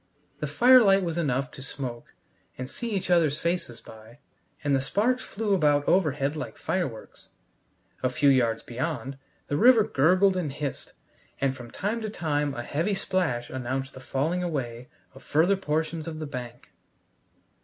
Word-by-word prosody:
The -, -, -2 dB
firelight 235 Hz, -6 st, +6 dB
was 170 Hz, -1 st, -2 dB
enough 135 Hz, -4 st, -1 dB
to -, -, -10 dB
smoke 130 Hz, -3 st, -7 dB, 0.4 s
and 130 Hz, -, -5 dB
see 235 Hz, -, -5 dB
each 190 Hz, -3 st, -2 dB
other's 160 Hz, -4 st, +3 dB
faces 170 Hz, -9 st, -2 dB
by, 110 Hz, +2 st, -14 dB, 0.5 s
and 145 Hz, -1 st, +2 dB
the 135 Hz, -, +1 dB
sparks 230 Hz, -, +1 dB
flew 210 Hz, -1 st, -2 dB
about 145 Hz, -5 st, +3 dB
overhead 150 Hz, -5 st, +2 dB
like 150 Hz, -, -6 dB
fireworks. 140 Hz, -13 st, -4 dB, 0.7 s
A 130 Hz, -, +1 dB
few 140 Hz, +3 st, +3 dB
yards 120 Hz, -4 st, +2 dB
beyond, 135 Hz, +1 st, -4 dB, 0.3 s
the 145 Hz, -, -1 dB
river 235 Hz, +1 st, +7 dB
gurgled 185 Hz, +6 st, +3 dB
and 170 Hz, -6 st, -2 dB
hissed, 140 Hz, 0 st, -5 dB, 0.5 s
and 135 Hz, -1 st, +1 dB
from 120 Hz, -2 st, -10 dB
time 215 Hz, -, -3 dB
to 215 Hz, -, -3 dB
time 150 Hz, -7 st, -1 dB
a 120 Hz, -, -4 dB
heavy 165 Hz, +11 st, -1 dB
splash 180 Hz, -11 st, -1 dB
announced 130 Hz, +1 st, -3 dB
the -, -, -10 dB
falling 150 Hz, +7 st, -1 dB
away 125 Hz, -8 st, -3 dB, 0.3 s
of 135 Hz, -, -14 dB
further 170 Hz, +6 st, +3 dB
portions 160 Hz, -2 st, -2 dB
of 160 Hz, -1 st, -5 dB
the 155 Hz, -, -4 dB
bank. 125 Hz, -4 st, -8 dB
150 Hz, 160 wpm, -27 LUFS, 130-180 Hz, 0.7 s, river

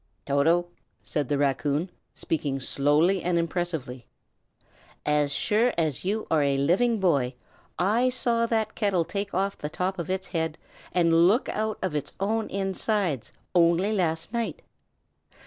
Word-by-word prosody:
"Toto," 160 Hz, +5 st, +3 dB, 0.4 s
said 145 Hz, -5 st, -2 dB
the 145 Hz, -, +1 dB
raccoon, 145 Hz, +4 st, 0 dB, 0.2 s
speaking 145 Hz, -4 st, -2 dB
slowly 150 Hz, +8 st, +2 dB
and 175 Hz, 0 st, 0 dB
impressively, 165 Hz, -7 st, -3 dB, 1.0 s
"as 150 Hz, -1 st, +2 dB
sure 225 Hz, +10 st, +1 dB
as 155 Hz, -5 st, -1 dB
you 210 Hz, +4 st, -1 dB
are 160 Hz, -2 st, +4 dB
a 140 Hz, -1 st, +2 dB
living 205 Hz, -, +2 dB
boy, 140 Hz, -9 st, +1 dB, 0.4 s
I 220 Hz, +8 st, +2 dB
saw 235 Hz, -2 st, +1 dB
that 220 Hz, -1 st, 0 dB
kettle 195 Hz, -6 st, +1 dB
take 200 Hz, +1 st, -4 dB
off 195 Hz, +2 st, -1 dB
the 150 Hz, -, -4 dB
top 185 Hz, +4 st, -2 dB
of 170 Hz, -, -4 dB
its 190 Hz, 0 st, -2 dB
head 160 Hz, -2 st, -2 dB, 0.3 s
and 170 Hz, -1 st, +4 dB
look 225 Hz, +8 st, +2 dB
out 215 Hz, 0 st, -2 dB
of 185 Hz, -4 st, -1 dB
its 150 Hz, -2 st, -3 dB
own 220 Hz, +3 st, 0 dB
inside, 195 Hz, -, -1 dB, 0.2 s
only 175 Hz, +4 st, +3 dB
last 165 Hz, 0 st, -1 dB
night. 235 Hz, -1 st, -2 dB
175 Hz, 145 wpm, -26 LUFS, 150-200 Hz, 1.0 s, are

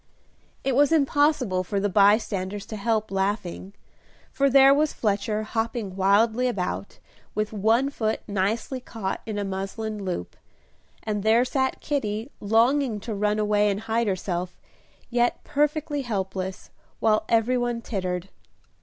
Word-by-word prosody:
It 270 Hz, -2 st, 0 dB
was 290 Hz, +3 st, +4 dB
impossible 285 Hz, -, +2 dB
for 200 Hz, +2 st, -2 dB
the 205 Hz, -, +1 dB
bystanders 200 Hz, -1 st, +2 dB
to 220 Hz, -, -7 dB
help 215 Hz, 0 st, -1 dB
laughing, 195 Hz, -1 st, -2 dB, 0.6 s
for 275 Hz, 0 st, +2 dB
there 270 Hz, +1 st, +7 dB
was 300 Hz, +1 st, +1 dB
Fletcher 210 Hz, 0 st, -1 dB
hopping 225 Hz, -3 st, -3 dB
wildly 220 Hz, +6 st, +3 dB
about, 200 Hz, -3 st, -3 dB, 0.4 s
with 215 Hz, +1 st, -1 dB
one 225 Hz, +7 st, +2 dB
foot 220 Hz, -5 st, -1 dB
nicely 210 Hz, +6 st, -1 dB
caught 225 Hz, -6 st, -5 dB
in 215 Hz, -2 st, -3 dB
a 205 Hz, -, -1 dB
muslin 195 Hz, +2 st, -4 dB
loop, 180 Hz, -, -4 dB, 0.7 s
and 210 Hz, -2 st, -2 dB
there 225 Hz, +4 st, +4 dB
sat 265 Hz, 0 st, -1 dB
Kitty 230 Hz, -3 st, -2 dB
longing 230 Hz, +3 st, +2 dB
to 225 Hz, +1 st, -5 dB
run 210 Hz, +1 st, 0 dB
away 210 Hz, 0 st, +2 dB
and 200 Hz, +1 st, -2 dB
hide 225 Hz, +1 st, 0 dB
herself, 180 Hz, -2 st, -2 dB, 0.5 s
yet 240 Hz, 0 st, +1 dB
perfectly 295 Hz, 0 st, 0 dB
helpless, 190 Hz, -5 st, -4 dB, 0.3 s
while 215 Hz, -1 st, +3 dB
every 230 Hz, +2 st, +3 dB
one 240 Hz, -1 st, -1 dB
tittered. 185 Hz, -4 st, -3 dB
215 Hz, 135 wpm, -25 LUFS, 200-245 Hz, 0.7 s, there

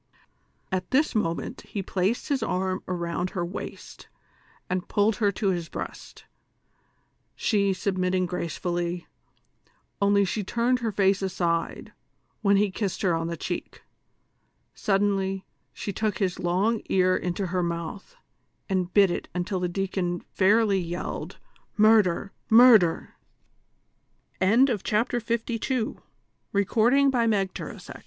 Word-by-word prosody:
At 185 Hz, -1 st, -2 dB
this 290 Hz, +4 st, +2 dB
moment 170 Hz, -7 st, -2 dB
he 200 Hz, -, -5 dB
placed 190 Hz, +6 st, -1 dB
his 280 Hz, -2 st, +1 dB
arm 185 Hz, +1 st, -1 dB
around 175 Hz, 0 st, -2 dB
her 175 Hz, -2 st, -3 dB
waist 180 Hz, +3 st, -8 dB, 0.6 s
and 185 Hz, +1 st, -2 dB
pulled 205 Hz, 0 st, +2 dB
her 205 Hz, -3 st, +2 dB
to 200 Hz, +1 st, 0 dB
his 175 Hz, -3 st, -2 dB
breast, -, -, -8 dB, 1.1 s
she 200 Hz, -3 st, +1 dB
submitting 185 Hz, -1 st, 0 dB
gracefully, 175 Hz, 0 st, -3 dB, 1.0 s
only 200 Hz, 0 st, +4 dB
she 210 Hz, +3 st, -2 dB
turned 240 Hz, +5 st, +1 dB
her 230 Hz, -3 st, -1 dB
face 195 Hz, 0 st, +2 dB
aside, 175 Hz, -3 st, -2 dB, 0.5 s
when 200 Hz, -2 st, +4 dB
he 205 Hz, -1 st, +2 dB
kissed 195 Hz, 0 st, -3 dB
her 180 Hz, -3 st, +3 dB
on 165 Hz, 0 st, -1 dB
the 170 Hz, 0 st, -4 dB
cheek; -, -, -5 dB, 0.9 s
suddenly 195 Hz, -2 st, 0 dB, 0.3 s
she 200 Hz, -, -5 dB
took 215 Hz, -2 st, -1 dB
his 185 Hz, -3 st, -1 dB
long 195 Hz, +6 st, +1 dB
ear 185 Hz, -1 st, +3 dB
into 180 Hz, +2 st, -2 dB
her 180 Hz, -, +1 dB
moutli, 170 Hz, -, -4 dB, 0.5 s
and 185 Hz, -2 st, -1 dB
bit 200 Hz, -3 st, +6 dB
it -, -, -4 dB
until 180 Hz, +1 st, -1 dB
the 180 Hz, 0 st, -1 dB
deacon 180 Hz, -1 st, -2 dB
fairly 200 Hz, 0 st, +3 dB
yelle 175 Hz, +1 st, -4 dB
190 Hz, 105 wpm, -26 LUFS, 180-200 Hz, 1.1 s, bit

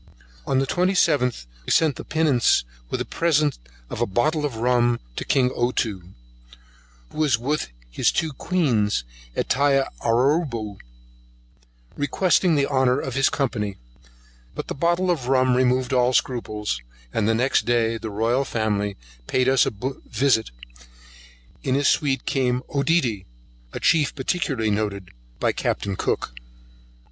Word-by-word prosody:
On 135 Hz, -, +1 dB
the 135 Hz, -, +2 dB
twenty 180 Hz, +6 st, +1 dB
seventh 125 Hz, -, +2 dB, 0.2 s
we -, -, -4 dB
sent 155 Hz, -5 st, +3 dB
the -, -, -7 dB
Pinnace 150 Hz, -7 st, +2 dB, 0.3 s
with -, -, -2 dB
a -, -, -2 dB
present 155 Hz, -4 st, +1 dB, 0.3 s
of -, -, -6 dB
a -, -, +2 dB
bottle 150 Hz, -, +1 dB
of 130 Hz, -, -8 dB
rum 120 Hz, 0 st, +2 dB, 0.2 s
to -, -, -3 dB
king 130 Hz, -2 st, +2 dB
Ottoo, 110 Hz, -7 st, -2 dB, 1.0 s
who -, -, -12 dB
was 145 Hz, -6 st, +3 dB
with 145 Hz, +6 st, -2 dB, 0.2 s
his -, -, +2 dB
two 160 Hz, -2 st, -1 dB
queens 125 Hz, -, 0 dB, 0.3 s
at -, -, -1 dB
Tiaraboo, 135 Hz, -, +1 dB, 1.2 s
requesting 175 Hz, +3 st, +2 dB
the 140 Hz, -1 st, +2 dB
honour 130 Hz, -2 st, +2 dB
of 130 Hz, -, -4 dB
his 135 Hz, +1 st, +3 dB
company, 105 Hz, -8 st, -2 dB, 0.8 s
but -, -, -6 dB
the -, -, -2 dB
bottle 175 Hz, +4 st, +1 dB
of 140 Hz, -8 st, -2 dB
rum 130 Hz, -1 st, +3 dB
removed 130 Hz, 0 st, +1 dB
all 125 Hz, 0 st, +3 dB
scruples, 110 Hz, -, -1 dB, 0.3 s
and 110 Hz, -, +1 dB
next 120 Hz, +4 st, +2 dB
day 115 Hz, -1 st, +1 dB
the 110 Hz, -, -5 dB
royal 115 Hz, +6 st, +1 dB
family 105 Hz, -5 st, -1 dB, 0.3 s
paid 130 Hz, 0 st, +1 dB
us 130 Hz, -1 st, +4 dB
a 125 Hz, +6 st, -3 dB
visit, 130 Hz, -5 st, +1 dB
and -, -, -19 dB, 0.7 s
in 130 Hz, -, 0 dB
his 140 Hz, 0 st, +2 dB
suit 135 Hz, -3 st, +1 dB
came 125 Hz, -2 st, 0 dB
Oedidy, 140 Hz, -, +1 dB, 0.4 s
a -, -, -5 dB
chief 150 Hz, -4 st, +2 dB
particularly 130 Hz, -6 st, -1 dB
noticed 100 Hz, -3 st, -2 dB, 0.3 s
by -, -, +2 dB
Captain 100 Hz, -1 st, -2 dB
Cook. -, -, -2 dB
125 Hz, 140 wpm, -23 LUFS, 110-140 Hz, 1.2 s, us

